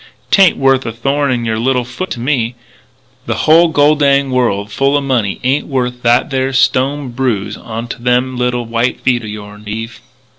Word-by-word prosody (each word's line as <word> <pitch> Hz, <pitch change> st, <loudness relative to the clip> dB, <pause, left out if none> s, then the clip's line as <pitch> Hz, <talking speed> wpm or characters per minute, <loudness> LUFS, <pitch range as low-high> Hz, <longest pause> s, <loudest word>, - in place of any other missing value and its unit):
'Tain't 195 Hz, -3 st, +5 dB
worth 135 Hz, -1 st, +2 dB
a 115 Hz, -, -4 dB
thorn 135 Hz, +5 st, -1 dB
in 120 Hz, -2 st, -1 dB
your 110 Hz, -1 st, -1 dB
little 125 Hz, +1 st, 0 dB
foot 185 Hz, +10 st, -6 dB
to 120 Hz, -, -5 dB
me.... 120 Hz, -2 st, -1 dB, 0.7 s
The -, -, -1 dB
hull 165 Hz, +2 st, +6 dB
gol 150 Hz, -1 st, +3 dB
dinged 140 Hz, -2 st, +2 dB
world 105 Hz, -5 st, 0 dB
full 140 Hz, +4 st, +1 dB
o' -, -, -1 dB
money 125 Hz, -8 st, -1 dB
ain't 135 Hz, +3 st, 0 dB
worth 125 Hz, -3 st, -2 dB
that 120 Hz, +3 st, +2 dB
there 135 Hz, 0 st, -1 dB
stone 135 Hz, +2 st, +1 dB
bruise 120 Hz, -5 st, -2 dB
onto 115 Hz, +2 st, -7 dB
them 125 Hz, +1 st, +1 dB
little 125 Hz, -1 st, -1 dB
white 115 Hz, +2 st, -1 dB
feet 125 Hz, -2 st, +1 dB
o' 110 Hz, -, -8 dB
yourn, 105 Hz, 0 st, -9 dB
Eve. 110 Hz, +1 st, -6 dB
125 Hz, 185 wpm, -15 LUFS, 115-135 Hz, 0.7 s, hull